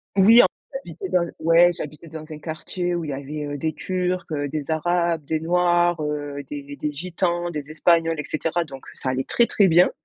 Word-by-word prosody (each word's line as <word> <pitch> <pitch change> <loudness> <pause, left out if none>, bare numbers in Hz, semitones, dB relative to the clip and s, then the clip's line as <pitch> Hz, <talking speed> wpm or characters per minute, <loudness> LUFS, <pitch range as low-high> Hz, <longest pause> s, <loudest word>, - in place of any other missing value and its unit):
Oui, 220 +5 +8
en - - +5 0.3
j'habitais 435 -5 -6
dans 180 - +3
le 170 - -6
ouais, 165 +2 +5
j'habitais 155 0 -8
dans 155 0 -8
un 155 - -7
quartier 175 +3 -3
où 170 - -2
il 150 - -5
y - - -2
avait, 145 +2 -5
heu, - - -3
des 155 +2 -2
turcs, 180 -1 -2
heu, 145 -1 -1
des 145 0 -4
arabes, 170 0 +1
des 160 +1 -1
noirs, 175 0 +2
heu, 145 -1 -3
des 145 -1 -7
des 150 +2 -3
gitans, 175 +2 -2
des 150 -1 -6
espagnols, 165 0 +2
et 145 - -3
cetera. 165 +2 -1
Donc, 135 -4 -11
ça 130 - -4
allait 130 +1 0
très, 235 - +2
très 200 -4 +3
bien. 175 +2 +5
165 Hz, 215 wpm, -23 LUFS, 150-175 Hz, 0.3 s, Oui